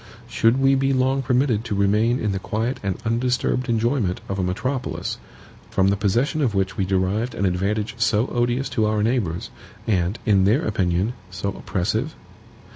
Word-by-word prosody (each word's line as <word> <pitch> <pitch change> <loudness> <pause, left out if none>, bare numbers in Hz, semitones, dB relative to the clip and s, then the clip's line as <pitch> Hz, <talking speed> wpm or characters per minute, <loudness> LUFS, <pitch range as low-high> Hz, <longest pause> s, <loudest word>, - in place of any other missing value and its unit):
Should 115 +4 +2
we 135 0 +4
be 135 0 +2
long 130 +1 +2
permitted 125 -4 +1
to 110 -3 -2
remain 105 +5 +2
in 105 - 0
the 95 - -2
quiet 115 +6 -2
and 95 -2 -2
undisturbed 125 +2 0
enjoyment 115 -4 +1
of 100 0 -3
a - - +1
metropolis, 115 +9 -3 0.5
from 95 0 +2
the 100 - +2
possession 115 +10 0
of 120 -7 +1
which 95 0 0
we 95 - 0
derived 95 +5 0
an 100 - 0
advantage 100 +4 -1
so 115 -1 +2
odious 120 +2 0
to 110 -2 +1
our 105 -1 +1
neighbors, 110 -8 -1 0.3
and, 95 -1 0
in 100 -3 +4
their 120 +11 +2
opinion, 95 +2 0 0.2
so 95 +1 -3
oppressive? 110 - -2
110 Hz, 170 wpm, -23 LUFS, 95-125 Hz, 0.5 s, we